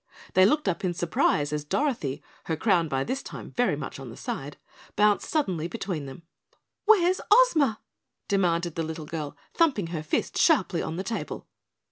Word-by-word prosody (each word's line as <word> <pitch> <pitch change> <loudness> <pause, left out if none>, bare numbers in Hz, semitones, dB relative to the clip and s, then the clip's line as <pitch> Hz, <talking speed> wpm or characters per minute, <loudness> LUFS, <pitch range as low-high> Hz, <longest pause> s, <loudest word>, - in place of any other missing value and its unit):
They 185 0 +6
looked 300 +3 +1
up 185 0 -1
in 180 -2 0
surprise 150 -3 +1
as 150 -1 -2
Dorothy, 150 - -1 0.2
her 160 - -1
crown 175 -3 +2
by 135 -2 -1
this 270 - -3
time - - -9
very 245 -11 +1
much 140 -1 -6
on 135 -2 -8
the 115 - -10
side, 140 +1 -5 0.4
bounced 210 0 +3
suddenly 185 - 0
between 180 -8 -4
them. 135 +5 -10 0.6
"Where's 375 -4 +4
Ozma?" 330 - +5 0.5
demanded 175 -4 +1
the 165 - -2
little 160 -1 -5
girl, 150 -2 -5 0.2
thumping 280 - +2
her 160 - -2
fist 155 - -1
sharply 190 - +3
on 160 - -4
the 185 - -3
table. 230 - -4
175 Hz, 170 wpm, -27 LUFS, 155-240 Hz, 0.6 s, They